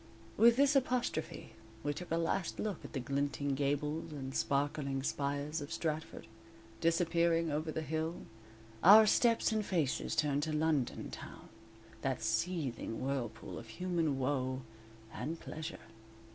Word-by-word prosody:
_ - - -22 0.3
With 230 +2 +6
this 280 +2 +4
apostrophe, 255 -2 -1 0.3
we 145 - 0
took 175 +4 -7
a 165 - +1
last 165 +2 -1
look 210 -5 -3
at - - -9
the 135 - -1
glinting 140 +2 -1
gables 145 +3 -1
and 135 -3 -6
sparkling 140 -1 0
spires 145 +2 -2
of 145 +2 -7
Stratford, 160 -1 -3 0.5
disappearing 165 -1 +2
over 155 +2 -1
the 160 - -3
hill, 160 +2 -3 0.6
our 215 +5 +10
steps 230 +2 +3
and 215 -1 +1
faces 165 -9 0
turned 145 -1 +2
to 155 +1 -2
London 150 -4 0
town, - - -9 0.5
that - - -1
seething 145 -11 -1
whirlpool 120 -4 -3
of 115 - -11
human 165 +2 -1
woe 130 -1 -1 0.5
and 165 +2 -4
pleasure. 160 +1 -6
155 Hz, 140 wpm, -34 LUFS, 140-170 Hz, 0.6 s, our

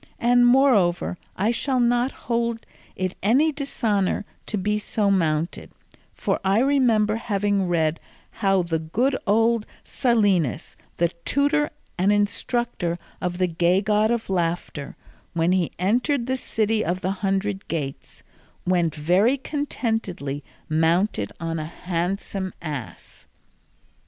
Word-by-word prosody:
And 245 +1 +4
moreover 240 -11 +3 0.2
I 205 +4 +1
shall 260 +2 0
not 240 +2 +2
hold 235 -1 -2 0.3
it 185 0 -2
any 265 +11 +3
dishonour 215 -9 -1 0.2
to 215 - -2
be 210 +2 0
so 210 -1 0
mounted, 165 -3 0 0.5
for - - -1
I 195 +1 +3
remember 235 -6 +3
having 205 -3 0
read 165 -2 +1 0.3
how 195 -2 +1
the 165 -1 -1
good 235 - 0
old 225 +1 +3 0.2
Silenus, 205 - +1 0.2
the 170 0 +2
tutor 290 +2 +2 0.3
and 190 +3 +4
instructor 205 -3 0 0.2
of 175 0 -2
the 185 - +2
gay 175 +2 +2
god 215 +1 +2
of 235 -1 -1
laughter, 170 -5 -2 0.4
when 165 +1 +2
he 185 -3 +1
entered 240 - +1
the 260 +1 0
city 220 -3 0
of 180 +2 -2
the 185 - 0
hundred 195 0 -1
gates, 145 -5 -5 0.4
went 175 -3 +1
very 185 - +3
contentedly 225 - -3 0.2
mounted 160 - +1
on 165 0 -3
a 155 - -3
handsome 180 +3 -3
ass." 140 - -7
200 Hz, 125 wpm, -24 LUFS, 175-235 Hz, 0.5 s, And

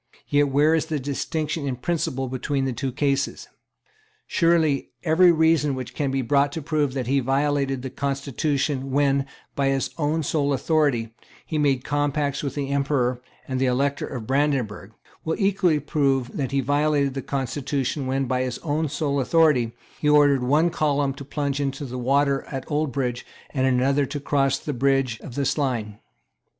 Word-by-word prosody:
Yet 145 0 +3
where 145 +4 +3
is 160 -1 +1
the 155 -2 -2
distinction 145 +2 -3
in 130 - -1
principle 135 -1 -2
between 135 +2 -2
the 130 - -1
two 130 +3 -3
cases? 140 +1 -1 0.8
Surely 165 -5 +2
every 175 +2 +5
reason 160 -3 +3
which 130 -2 -6
can 145 -3 -1
be 135 0 -1
brought 140 +3 +2
to 160 - -4
prove 150 -3 0
that 130 -2 -2
he 135 +3 +2
violated 135 0 0
the 130 - -5
constitution, 140 0 -1
when, 140 0 +2 0.3
by 140 -1 0
his 135 -1 0
own 155 +1 0
sole 145 -1 0
authority, 135 -6 +1 0.3
he 155 - -2
made 135 -3 +2
compacts 145 -1 -1
with 140 - -4
the 140 -2 -2
Emperor 135 -3 0 0.3
and 130 -1 -2
the 135 - +3
Elector 140 +3 0
of 125 -5 -6
Brandenburg, 130 -7 0 0.3
will 160 - -2
equally 190 -6 +2
prove 135 -3 0
that 135 -4 -2
he 140 0 +1
violated 145 0 +1
the 135 - -3
constitution, 135 +1 -2
when, 135 +1 0
by 125 0 0
his 130 -1 -2
own 155 0 0
sole 145 0 -1
authority, 135 -4 +3 0.3
he 150 - +1
ordered 145 -2 +5
one 150 +7 +3
column 145 -4 +1
to 140 +1 -9
plunge 140 0 -2
into 140 0 -3
the 125 -1 -5
water 140 +2 +2
at 135 -2 -5
Oldbridge 135 -5 -1 0.3
and 130 -2 +1
another 135 +2 +2
to 145 0 -4
cross 135 -1 +1
the 150 - -4
bridge 135 -2 +1
of 120 - -9
Slane. 120 -8 -1
140 Hz, 170 wpm, -24 LUFS, 130-150 Hz, 0.8 s, every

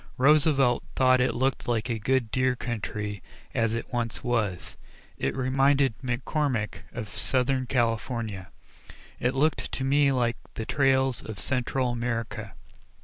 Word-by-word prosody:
Roosevelt 140 -2 +4
thought 130 -1 +4
it 125 - +1
looked 130 +2 0
like 115 -3 0
a 115 -2 -2
good 120 0 +1
deer 130 -1 +2
country, 105 -4 -4 0.3
as 115 -1 +1
it 115 - -6
once 115 -2 -2
was; 110 -7 -1 0.4
it 70 - -1
reminded 135 +1 +3
McCormick 125 -3 -1
of 115 -3 -5
Southern 130 0 +1
California; 115 -5 -1 0.7
it 125 +2 0
looked 150 +4 +1
to 135 - -2
me 140 +1 +4
like 120 -2 +1 0.2
the 110 - -4
trails 135 -2 +2
in 110 - -6
Central 125 +4 -1
America. 115 -3 -3
125 Hz, 135 wpm, -27 LUFS, 115-135 Hz, 0.7 s, Roosevelt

